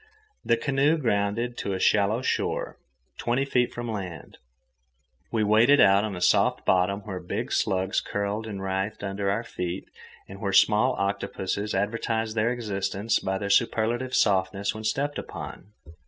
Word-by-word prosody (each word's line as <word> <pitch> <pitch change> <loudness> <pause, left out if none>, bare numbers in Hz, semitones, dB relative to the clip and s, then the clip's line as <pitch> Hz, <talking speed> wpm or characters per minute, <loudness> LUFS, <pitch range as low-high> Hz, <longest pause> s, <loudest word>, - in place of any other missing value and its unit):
The 115 - +2
canoe 140 +5 +2
grounded 115 -1 -1
on 100 - -2
a - - -1
shallow 105 +6 +2
shore, - - -2 0.4
twenty 125 +3 0
feet 125 -3 +1
from 120 -1 -5
land, 90 -7 -7
and - - -45
we 110 -2 +1
waded 115 +7 +5
out 100 +1 +6
on 105 -3 -3
a 90 - -7
soft 90 - +3
bottom 95 +2 +2
where 95 -3 -6
big 90 - -4
slugs 95 0 +1
curled 105 +2 -3
and 100 -3 -6
writhed 95 +3 -3
under 100 0 -2
our 110 +4 0
feet 90 -4 -5 0.4
and 100 0 -11
where 100 -1 -1
small 110 +6 +4
octopuses 100 +1 -2
advertised 110 +2 -1
their 115 +2 +2
existence 105 -2 -1
by 95 0 -2
their 100 0 -2
superlative 115 +4 +1
softness 95 0 +1
when 110 +1 -8
stepped 145 +6 -1
upon. 100 - -8
100 Hz, 155 wpm, -26 LUFS, 95-115 Hz, 0.4 s, out